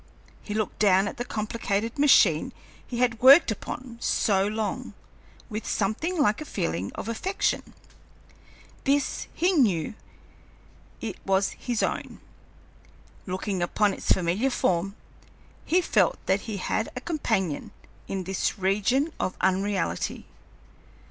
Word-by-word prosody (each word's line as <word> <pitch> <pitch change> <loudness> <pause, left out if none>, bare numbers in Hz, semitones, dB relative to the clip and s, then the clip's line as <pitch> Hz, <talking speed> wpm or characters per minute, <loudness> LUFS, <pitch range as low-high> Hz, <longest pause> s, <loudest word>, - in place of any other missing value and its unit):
He 210 - -5
looked 215 -1 -2
down 195 -1 +4
at - - -6
the 245 - -2
complicated 220 +2 -2
machine 195 - +5 0.3
he 240 - -5
had 240 -2 +1
worked 270 +1 +8
upon 235 +2 -6
so 195 -2 +2
long, 215 0 -3 0.5
with 215 -1 -5
something 270 - -1
like 235 -1 +2
a - - -5
feeling 85 - -2
of - - -6
affection. 365 - -2 1.1
This 280 0 +1
he 355 +3 +2
knew, 210 - +2 1.1
it 220 -4 -4
was 195 0 +2
his 240 -3 -2
own. - - -3 1.1
Looking 190 0 -2
upon 200 +3 +2
its - - -2
familiar 185 +9 +2
form, 195 -5 0 0.7
he 360 +3 +3
felt 200 - +2
that 190 +1 +2
he 210 - -3
had 215 +3 -1
a 250 - -4
companion 220 - -1 0.4
in 190 -1 -3
this 190 +4 -1
region 210 - +1
of 185 - -2
unreality. 190 +1 0
210 Hz, 125 wpm, -26 LUFS, 190-250 Hz, 1.1 s, worked